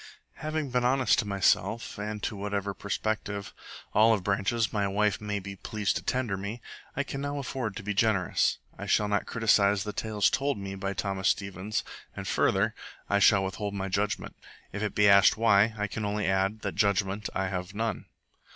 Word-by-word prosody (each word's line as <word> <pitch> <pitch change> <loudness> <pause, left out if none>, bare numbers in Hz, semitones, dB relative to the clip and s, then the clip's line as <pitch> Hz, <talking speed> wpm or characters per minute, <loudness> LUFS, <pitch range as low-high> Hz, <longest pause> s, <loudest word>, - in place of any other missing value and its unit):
Having 155 -3 -3
been 125 0 +1
honest 130 +1 +3
to 110 - -1
myself, 100 +3 +1
and 105 0 -4
to - - -2
whatever 100 0 -2
prospective 105 0 -3 0.4
olive 110 -2 +4
branches 100 +4 0
my 100 -2 +1
wife 105 +2 +1
may 105 -1 -2
be 100 0 -6
pleased 105 +1 -2
to - - -2
tender 125 -6 -1
me, 100 +5 -5 0.4
I 140 - 0
can 135 0 -5
now 145 0 -3
afford 130 -6 -3
to 115 - -6
be 105 +1 -2
generous. 105 -3 +2 0.2
I - - -7
shall 105 - +3
not 105 -1 0
criticize 105 -3 +3
the 105 -1 -5
tales 105 -3 +1
told 140 -2 0
me 100 -1 -5
by 95 0 -3
Thomas 95 0 -1
Stevens, 100 +1 -2 0.3
and, - - -6
further, - - +2 0.4
I 100 - +4
shall 100 -1 +5
withhold 100 +2 -3
my 95 0 -3
judgment. 105 +2 -1 0.4
If 105 - -4
it 105 - -2
be 105 0 +5
asked 100 0 +6
why, 110 -1 +4
I 105 - 0
can 105 +1 -5
only 105 0 -1
add 95 +3 +1
that 100 - -3
judgment 100 0 +1
I 95 0 0
have 90 +1 -5
none. 110 -1 -2
105 Hz, 190 wpm, -28 LUFS, 100-110 Hz, 0.4 s, asked